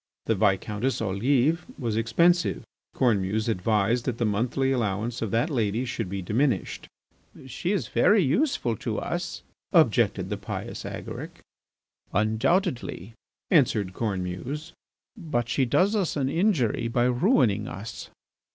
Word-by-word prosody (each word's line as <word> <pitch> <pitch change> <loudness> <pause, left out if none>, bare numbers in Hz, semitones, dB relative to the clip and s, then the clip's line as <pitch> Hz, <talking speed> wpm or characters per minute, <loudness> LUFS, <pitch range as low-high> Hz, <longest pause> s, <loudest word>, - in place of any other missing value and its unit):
The 115 - +2
Viscountess 105 +4 0
Olive 125 - +1
was 115 -5 -2
expensive. 170 +11 +2 0.3
Cornemuse 110 -3 +1
advised 110 +3 +1
that 125 -3 -2
the 120 - 0
monthly 120 +6 0
allowance 115 -1 -1
of 115 - -1
that 115 - 0
lady 115 -1 0
should 115 -5 -3
be 95 0 -4
diminished. 115 - -1 0.6
"She 130 +8 -3
is 175 - -1
very 195 - +4
useful 160 - +1
to - - -3
us," - - -4 0.3
objected - - +3
the - - -1
pious - - -6
Agaric. - - -7 0.7
"Undoubtedly," 115 - 0 0.4
answered 110 - +3
Cornemuse, 105 - -4 0.4
"but 150 - -2
she 130 +3 +1
does 190 - +2
us 195 -6 0
an 135 -2 0
injury 145 - +1
by 120 +1 +1
ruining 125 - +2
us." 100 +4 -7
120 Hz, 125 wpm, -26 LUFS, 105-145 Hz, 0.7 s, very